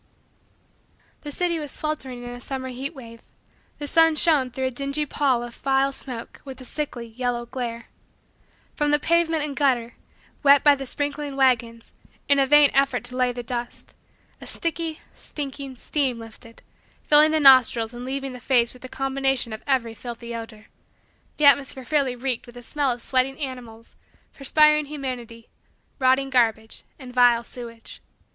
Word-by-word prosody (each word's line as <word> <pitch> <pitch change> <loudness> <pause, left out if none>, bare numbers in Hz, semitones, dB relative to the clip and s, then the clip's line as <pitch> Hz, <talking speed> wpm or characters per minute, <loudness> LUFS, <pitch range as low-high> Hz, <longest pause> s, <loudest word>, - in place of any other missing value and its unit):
The 295 - -7
city 340 +2 0
was 295 -2 -6
sweltering 265 -6 -4
in 245 - -7
a 245 0 -9
summer 260 0 -5
heat 270 +5 -5
wave. 230 -3 -11 0.6
The 295 - -5
sun 325 +2 +4
shone 300 -5 +3
through 260 +1 -3
a 260 - -1
dingy 280 +4 -2
pall 265 -4 +1
of 240 -1 -8
vile 270 0 +1
smoke 250 -3 -8
with 265 -2 -9
a 255 - -10
sickly, 255 -3 -5
yellow, 240 +1 -3
glare. 235 -2 -5 0.9
From 295 -1 0
the 295 - +4
pavement 325 0 +1
and 290 -2 -4
gutter, 250 -5 +1 0.5
wet 280 -1 +6
by 290 - +7
the 270 -1 -5
sprinkling 290 0 -3
wagons, 235 -4 +1 0.4
in 280 0 +4
a 270 - +3
vain 295 0 +6
effort 275 -2 +2
to 250 +1 -5
lay 250 -1 +2
the 245 0 -6
dust, 240 0 -6 0.5
a - - -9
sticky, 330 -1 -2
stinking, 275 -2 -7
steam 265 -1 -1
lifted, 230 +1 -12 0.4
filling 300 +1 +6
the 315 0 +2
nostrils 250 -5 +5
and 240 +1 -8
laving 270 0 -4
the 250 - -9
face 240 -2 +2
with 250 - -14
a 255 - -8
combination 270 -3 -1
of 220 - -7
every 250 -5 +1
filthy 235 0 -8
odor. 225 -2 -8 0.7
The 300 - +2
atmosphere 275 -2 +4
fairly 280 -4 0
reeked 250 -1 -3
with 240 - -14
the 245 - -10
smell 285 +1 -1
of 240 -1 -5
sweating 265 +1 +1
animals, 245 -5 -8 0.4
perspiring 300 +2 +3
humanity, 250 -5 -6 0.5
rotting 265 +1 +2
garbage, 225 -3 0
and 255 -3 -11
vile 245 -1 +4
sewage. 230 -1 -11
260 Hz, 165 wpm, -24 LUFS, 240-285 Hz, 0.9 s, by